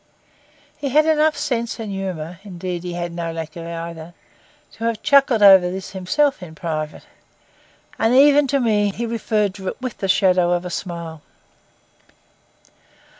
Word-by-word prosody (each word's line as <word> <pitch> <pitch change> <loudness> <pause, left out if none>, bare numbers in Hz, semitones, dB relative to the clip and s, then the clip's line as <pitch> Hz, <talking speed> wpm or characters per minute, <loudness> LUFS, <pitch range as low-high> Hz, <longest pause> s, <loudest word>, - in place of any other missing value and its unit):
He 280 -2 -3
had 305 +4 +4
enough 310 -1 +2
sense 235 -2 -2
and 220 -3 -5
humour, 180 -3 -5
indeed 180 -3 -5
he 175 0 -6
had 175 0 -4
no 170 -1 -4
lack 160 -1 -6
of 165 -1 -7
either, 170 0 -7 0.6
to 225 - -7
have 230 -2 -2
chuckled 275 -6 +4
over 190 -3 +8
this 190 +1 -6
himself 195 +9 0
in 160 -3 -10
private; 155 -2 -4 1.0
and 225 +3 +2
even 285 +1 +6
to 275 +1 +1
me 210 -4 +2
he 230 +4 -4
referred 215 -3 -1
to 190 -1 -9
it - - -4
with 255 -2 -6
the 195 - -2
shadow 180 -2 +3
of 175 0 -2
a 180 - -5
smile. 170 -4 -6
190 Hz, 160 wpm, -21 LUFS, 170-230 Hz, 1.0 s, over